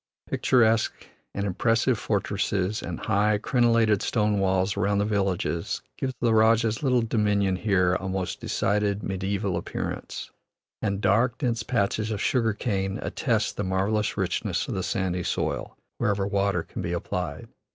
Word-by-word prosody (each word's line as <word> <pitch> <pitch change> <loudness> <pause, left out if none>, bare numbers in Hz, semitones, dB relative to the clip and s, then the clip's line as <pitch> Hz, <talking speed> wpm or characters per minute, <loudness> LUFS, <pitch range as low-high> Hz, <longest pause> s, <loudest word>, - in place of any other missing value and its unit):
Picturesque 115 -3 +2 0.3
and 100 - -1
impressive 115 +5 +1
fortresses, 100 -1 -1
and - - -5
high, 105 0 +2
crenellated 115 -3 +3
stone 105 -3 +1
walls 95 0 +1
around 100 0 +1
the 100 - +2
villages 95 -5 -1
give 130 -1 -3
the 115 -2 +2
rajah's 110 0 +3
little 125 -4 +2
dominion 105 -4 +1
here 90 -3 +2
a 95 +1 -2
most 95 -1 -3
decided 105 0 0
mediaeval 95 0 -2
appearance, - - -5 0.5
and 100 0 -1
dark, 115 +5 +2
dense 120 -4 -1
patches 110 -2 0
of 105 -2 -2
sugar 115 -2 +1
cane 95 -3 -2
attest - - -1
the 105 - -1
marvellous 100 +3 0
richness - - -1
of - - -3
the - - -1
sandy 90 -2 -1
soil, - - -2 0.2
wherever 100 -1 +1
water 100 -3 0
can - - -7
be - - -2
applied. - - -3
105 Hz, 145 wpm, -26 LUFS, 95-110 Hz, 0.5 s, crenellated